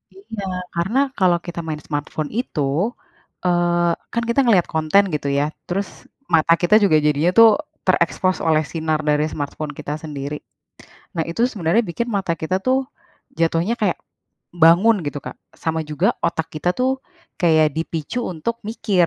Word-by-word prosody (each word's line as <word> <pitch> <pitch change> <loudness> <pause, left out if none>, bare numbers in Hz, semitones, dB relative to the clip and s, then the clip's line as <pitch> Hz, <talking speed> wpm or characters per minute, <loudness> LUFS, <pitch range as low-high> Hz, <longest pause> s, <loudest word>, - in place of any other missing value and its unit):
Iya, 205 +1 -8 0.3
karena 190 +10 0 0.2
kalau 180 -2 +4
kita 175 -1 -6
main 155 -1 -4
smartphone 150 +1 -4
itu, 200 -11 -3 0.8
eee, 175 -1 +2 0.2
kan 235 - 0
kita 235 - +2
ngeliat 205 -8 +4
konten, 160 +5 +4
gitu 145 - -3
ya. 145 - +2 0.2
Terus, 190 +2 -1 0.5
mata 165 +1 +5
kita 175 +4 +4
juga 185 -6 +4
jadinya 150 +3 +3
tuh, 230 0 +9 0.4
terekspos 185 -1 +2
oleh 155 -1 +3
sinar 160 -2 -1
dari 150 0 +3
smartphone 145 +1 -4
kita 145 - -5
sendiri. 145 -1 -5 0.8
Nah, 165 - 0
itu 170 +7 -3
sebenarnya 195 +3 +1
bikin 225 +5 -3
mata 190 -4 0
kita 160 +4 -1
tuh, 260 +1 +1 0.5
jatuhnya 165 +6 +1
kayak 195 -5 +1 0.6
bangun, 180 +8 +6
gitu 145 0 -3
Kak. - - -8 0.2
Sama 160 -1 -2
juga 150 -1 0 0.2
otak 160 -1 -1
kita 155 +3 0
tuh, 255 +1 +1 0.5
kayak 155 -3 +4
dipicu 165 +6 -3
untuk 185 +7 -3
mikir. 210 -5 +1
170 Hz, 150 wpm, -21 LUFS, 155-200 Hz, 0.8 s, tuh